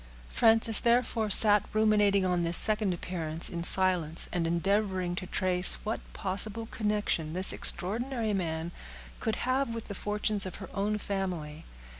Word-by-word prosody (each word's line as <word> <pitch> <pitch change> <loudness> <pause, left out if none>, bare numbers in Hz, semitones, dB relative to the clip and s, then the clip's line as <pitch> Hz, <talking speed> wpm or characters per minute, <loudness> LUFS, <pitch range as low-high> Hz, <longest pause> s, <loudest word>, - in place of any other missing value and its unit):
Frances, 225 -1 +1
therefore, 235 -2 -1
sat 205 +1 +5
ruminating 210 -2 0
on 180 -1 -2
this 170 0 +5
second 215 -2 +3
appearance 165 -2 -5
in 170 - -6
silence, 175 -4 +4
and 170 -2 -3
endeavoring 185 +1 -3
to 185 0 -8
trace 185 -1 +6
what 220 +1 -5
possible 200 +4 -1
connection 210 -8 -4
this 185 +2 +5
extraordinary 225 +5 -2
man 165 -3 -5 0.5
could 220 - -4
have 255 -2 -3
with 230 - -7
the 205 - -8
fortunes 210 0 -2
of 185 - -10
her 190 - -12
own 210 +1 -3
family. 180 -7 -7
195 Hz, 145 wpm, -27 LUFS, 175-215 Hz, 0.5 s, trace